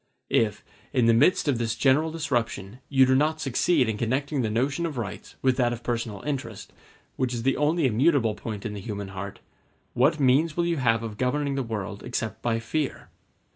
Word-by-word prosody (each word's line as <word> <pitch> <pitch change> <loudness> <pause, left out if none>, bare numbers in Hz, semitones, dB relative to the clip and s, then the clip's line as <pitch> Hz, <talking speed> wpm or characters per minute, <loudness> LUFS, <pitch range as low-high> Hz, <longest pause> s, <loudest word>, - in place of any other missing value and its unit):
If, 105 -2 +1 0.3
in 125 -4 +3
the 115 - +5
midst 145 +9 +4
of 135 -5 +1
this 115 -1 -1
general 145 +4 +3
disruption, 120 -9 -2
you 135 -2 +5
do 130 - +3
not 155 +4 +2
succeed 135 0 +2
in 110 -2 -2
connecting 135 +4 0
the 110 - 0
notion 135 +9 0
of 150 -5 -6
rights 110 -5 -6
with 130 -1 +3
that 120 -2 +2
of 120 0 -8
personal 115 -4 -3
interest, 130 -8 -5 0.4
which 125 -2 0
is 115 - -4
the 135 +1 +2
only 155 +2 +2
immutable 125 -1 +3
point 105 -2 -6
in 105 - -3
the 100 - -6
human 100 -2 -5
heart, 95 +1 -7 0.5
what 145 +6 +3
means 145 +5 +3
will 170 - +2
you 170 -1 0
have 115 -4 +2
of 110 -2 -6
governing 140 +3 0
the 135 - -1
world 105 -4 -4
except 110 -3 -4
by 120 -2 0
fear? 135 +6 -3
125 Hz, 200 wpm, -26 LUFS, 115-145 Hz, 0.5 s, the